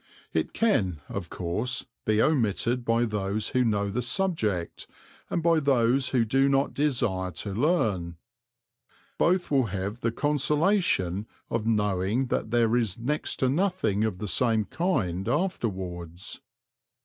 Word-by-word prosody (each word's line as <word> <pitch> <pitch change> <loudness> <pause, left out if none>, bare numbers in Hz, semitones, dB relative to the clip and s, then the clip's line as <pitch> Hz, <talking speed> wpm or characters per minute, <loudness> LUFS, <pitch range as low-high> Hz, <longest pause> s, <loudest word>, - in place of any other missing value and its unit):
It - - 0
can, 100 - +1
of 90 -4 -5
course, 105 +8 -2 0.2
be 110 0 +2
omitted 120 -3 +1
by 115 +1 +2
those 105 -1 -2
who 125 - +2
know 100 -3 0
the 125 +5 -1
subject 120 - -1 0.4
and 170 - -1
by 165 -1 +4
those 130 -2 +2
who 120 -3 +2
do 135 +5 +3
not 135 0 +1
desire 120 -10 0
to 95 +4 -5
learn. 105 - 0 1.0
Both 180 -1 +2
will 135 -4 +3
have 100 +3 -4
the 115 -1 0
consolation 145 - +1 0.2
of 115 -1 -1
knowing 105 +2 +1
that - - -1
there 115 0 +2
is 115 -6 0
next 145 +6 -1
to 130 - +4
nothing 145 - +1
of 110 -5 -1
the 105 - -5
same 110 +2 +2
kind 95 - -1
afterwards. 95 - -3
115 Hz, 135 wpm, -27 LUFS, 100-140 Hz, 1.0 s, by